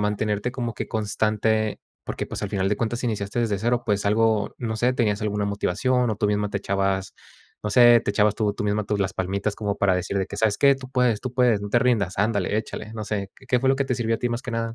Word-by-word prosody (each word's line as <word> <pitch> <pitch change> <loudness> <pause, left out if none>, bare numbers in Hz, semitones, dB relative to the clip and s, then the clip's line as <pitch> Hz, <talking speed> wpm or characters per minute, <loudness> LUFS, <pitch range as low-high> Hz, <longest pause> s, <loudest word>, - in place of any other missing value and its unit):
mantenerte 105 +2 -1
como 120 -3 -3
que - - -4
constante? 110 0 0 0.2
Porque, - - -4
pues, - - -6
al - - -3
final 95 -1 0
de 105 - 0
cuentas 120 +1 -2
iniciaste 110 -1 -2
desde 105 -4 0
cero, 120 +3 0
pues, 100 -1 0
algo, 110 0 +2
no 110 -2 -3
sé, 125 +3 +2
¿tenías 105 -4 0
alguna 105 -1 -1
motivación 120 +5 0
o 105 - -2
tú 105 - 0
misma 105 0 0
te 100 - -1
echabas, 95 -1 -1 0.5
no 105 - -2
sé, 120 +1 +7
te 105 - -2
echabas 105 0 +2
tú 105 -2 0
tú 105 - -5
misma 105 0 0
tus, 105 0 -1
las 95 -1 -1
palmitas 100 +2 -2
como 105 -2 -2
para 95 -2 +3
decir 95 +2 -2
de 95 - -1
que, 100 - -8
sabes 105 -1 +1
qué? 140 -1 +6
"Tú 130 -1 -10
puedes, 125 -4 +1
tú 130 - -4
puedes, 125 -5 +2
no 105 - -5
te - - +4
rindas, 105 -8 +1
ándale, 105 -1 +1
échale". 110 0 -6
No 110 -1 -5
sé, 100 -2 -3
¿qué 130 - -19
qué 125 -1 +2
fue 130 +1 +2
lo - - +4
que 140 -1 0
te 125 - 0
sirvió 115 -2 0
a - - -14
ti 120 - -1
más 120 +2 -3
que 130 - -6
nada? 115 0 -2
105 Hz, 265 wpm, -24 LUFS, 100-120 Hz, 0.5 s, sé